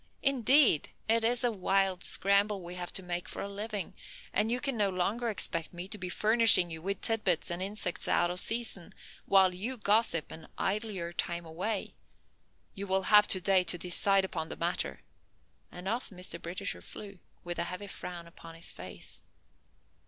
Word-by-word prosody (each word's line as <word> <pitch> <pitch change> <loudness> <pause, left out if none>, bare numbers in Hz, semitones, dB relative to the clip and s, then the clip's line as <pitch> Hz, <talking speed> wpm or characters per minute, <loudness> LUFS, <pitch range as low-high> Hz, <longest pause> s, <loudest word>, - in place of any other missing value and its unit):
Indeed, 265 - +5 0.2
it 225 +1 +4
is 240 +2 +2
a 245 - +2
wild 195 -2 0
scramble 200 0 +3
we 175 +1 -8
have 180 -1 -6
to 190 - -1
make 175 0 -4
for - - -5
a - - -5
living, 205 -1 -5 0.4
and 215 +2 +2
you 245 - +1
can 275 -1 -2
no 205 -3 +1
longer 200 +6 -2
expect 170 -6 -2
me 175 +2 -6
to 210 - -4
be 180 0 -5
furnishing 215 -4 +7
you 160 0 -7
with 195 +2 -4
tid 225 -1 0
bits 175 -2 0
and 175 +1 -4
insects 195 -2 -2
out 175 0 +2
of 180 - -1
season, 225 -6 -1 0.3
while 190 -2 +4
you 225 +8 -5
gossip 210 -6 +1
and 160 0 -10
idle 215 +3 -1
your 175 -4 -6
time 170 +1 -3
away. 185 +6 -4 0.8
You 200 0 -7
will 190 0 +1
have 210 0 +7
to 190 - +3
day 185 0 +3
to 175 - +2
decide 190 +2 +1
upon 160 -4 -5
the - - -7
matter," 170 +1 -3 0.7
and 180 +1 -9
off 235 +5 -3
Mr. 180 -3 -5
Britisher 185 +4 -5
flew, 200 -3 -11 0.2
with 175 0 -6
a 170 - 0
heavy 180 +3 -6
frown 180 -3 -7
upon 165 -1 -13
his 165 - -6
face. - - -10
195 Hz, 185 wpm, -30 LUFS, 175-215 Hz, 0.8 s, furnishing